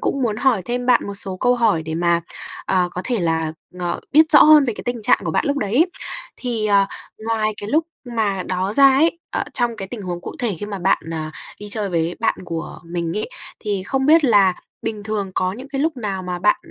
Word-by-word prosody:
cũng 275 - -1
muốn 220 -4 0
hỏi 240 -6 +2
thêm 245 +2 -2
bạn 250 -4 +4
một 200 - -5
số 195 -2 -4
câu 245 +6 +2
hỏi 225 -9 +2
để 160 0 -5
mà, 170 0 +2 0.5
à, 180 -1 +2
có 180 - -5
thể 245 -4 -1
là, 160 -2 0 0.3
ờ, 175 -1 -2
biết 310 +2 +6
rõ 295 - +9
hơn 305 -1 +7
về 240 - -1
cái - - -8
tình 245 -2 -3
trạng - - +4
của 165 - -1
bạn - - 0
lúc 285 0 0
đấy. 240 - +2 0.5
Thì, 235 -4 -2
ờ, 200 -1 +4 0.4
ngoài 220 -1 +1
cái 205 - -6
lúc 315 +4 +3 0.2
mà 220 -6 -1
đó 185 +2 -2
ra 275 +3 +6
ấy, 325 +5 +3
ở, - - -1
trong 240 -2 +1
cái 195 -2 -6
tình 215 0 -7
huống 175 -2 -4
cụ - - -7
thể 225 -8 -1
khi 205 - -4
mà 200 -2 -5
bạn, 190 +2 +2
à, 155 -1 -4 0.3
đi 205 0 -7
chơi 210 -1 +2
với 170 -1 -1
bạn 225 - +2
của 165 -2 -6
mình 170 0 -3
ấy, 210 - -2 0.3
thì 205 -3 -2
không 265 +7 -1
biết 320 0 +6
là 200 -6 +5 0.3
bình 220 -2 -3
thường 205 -2 -3
có 185 0 0
những 255 +7 -9
cái 275 -1 -3
lúc 310 -1 0
nào 200 -5 -3
mà 180 -1 -4
bạn 345 - +3
210 Hz, 240 wpm, -21 LUFS, 185-245 Hz, 0.5 s, rõ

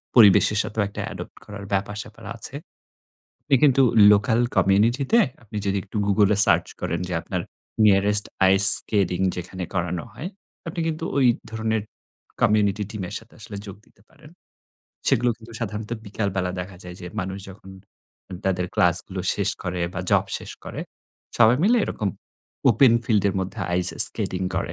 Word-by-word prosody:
পরিবেশের 105 -2 +6
সাথেও 110 -1 -3
একটা 100 - -7
adopt - - -9
করার 100 -1 -9
ব্যাপার-স্যাপার 105 +3 -4
আছে। 125 - -7 0.9
আপনি 140 - +1
কিন্তু 135 -2 +5 0.3
লোকাল 105 +3 +2 0.2
কমিউনিটিতে 120 - +2 0.2
আপনি 110 -2 -10
যদি 100 0 0
একটু 105 - -10
গুগল 100 0 +3
এ - - +1
সার্চ - - +2
করেন, 85 0 -3
যে - - -5
আপনার - - -4 0.5
nearest 105 +1 +4 0.3
ice 100 0 +5
skating 95 -3 0
যেখানে 90 +1 -6
করানো 90 -1 -2
হয়, 150 +9 -7 0.4
আপনি 165 +1 -5
কিন্তু 160 0 -4
ওই 135 - +4 0.2
ধরনের 110 -1 -2 0.6
কমিউনিটি 105 -1 +2
টিমের 100 -5 -6
সাথে - - -19
আসলে 100 - -9
যোগ 100 - -9
দিতে 100 - -27
পারেন। 150 - -18 0.8
সেগুলো 120 +1 +2
কিন্তু 115 0 -15
সাধারণত 105 -1 -5 0.2
বিকালবেলা 100 -3 -2
দেখা 90 +1 -9
যায় 90 -1 -9
যে 90 - -8
মানুষ 95 +1 -5
যখন 95 0 -14 0.8
তাদের 90 -2 0
ক্লাসগুলো 90 +2 +1
শেষ 100 0 0
করে 90 0 -4
বা 90 - -3
জব - - +3
শেষ - - -10
করে - - -7 0.6
সবাই 120 +1 +5
মিলে 225 +6 +4
এরকম 105 - -3 0.6
ওপেন 120 +2 +5
ফিল্ড 110 -3 +1
এর 100 - -3
মধ্যে 95 +4 -6
আইস 90 0 +2 0.2
স্কেটিং 95 0 -3
করে। - - -3
100 Hz, 155 wpm, -23 LUFS, 95-110 Hz, 0.9 s, পরিবেশের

